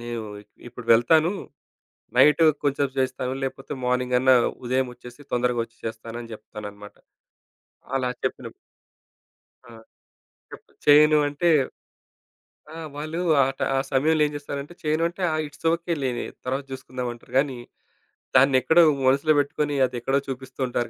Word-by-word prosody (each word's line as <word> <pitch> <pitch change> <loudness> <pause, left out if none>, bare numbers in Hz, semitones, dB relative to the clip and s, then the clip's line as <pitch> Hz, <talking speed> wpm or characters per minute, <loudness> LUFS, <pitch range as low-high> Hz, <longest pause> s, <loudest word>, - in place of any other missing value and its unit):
నేను 120 -1 -5 0.5
ఇప్పుడు 120 -1 -11
వెళ్తాను. 155 - +3 0.8
నైటు 150 +5 +6 0.2
కొద్దిసేపు 140 -1 0
చేస్తాను 130 0 -2
లేకపోతే 135 +1 -5
మార్నింగ్ 125 0 +1
అన్నా 130 0 +5 0.3
ఉదయం 130 +1 0
ఒచ్చేసి 125 +3 -14
తొందరగా 125 -1 +1
ఒచ్చి 115 0 -24
చేస్తాను 115 +1 -7
అని 115 - -12
చెప్తానన్నమాట. 105 -1 -10 1.0
అలా 125 -1 0
చెప్పినప్పుడు - - -4 1.2
ఆ! - - -13 0.8
చెప్ప్ - - -13
చేయను 150 +1 +7
అంటే 145 +4 0 1.2
ఆ! - - -9 0.2
వాళ్ళు 155 +3 -4 0.2
ఆహ్, 135 0 +2 0.2
ఆ - - +2
సమయంలో 150 +3 +3
ఏం 150 - -2
జేస్తారంటే 145 +2 -6
చేయను 155 +2 +1
అంటే 185 +2 -11 0.3
ఇట్స్ 145 +3 -16
ఓకే 170 +1 -2
లేవే 125 -2 -2 0.2
తరువాత 135 +2 -2
చూసుకుందామంటారు 125 -2 -7
గాని, 135 -3 -1 0.8
దాన్ని 135 +1 +5
ఎక్కడో 170 +1 +5 0.2
మనసులో 140 +4 +4
పెట్టుకొని 145 +1 -1
అది 125 0 -6
ఎక్కడో 135 +3 +1
చూపిస్తూ 130 0 -8
ఉంటారు 120 -1 -2
130 Hz, 130 wpm, -24 LUFS, 125-145 Hz, 1.2 s, చేయను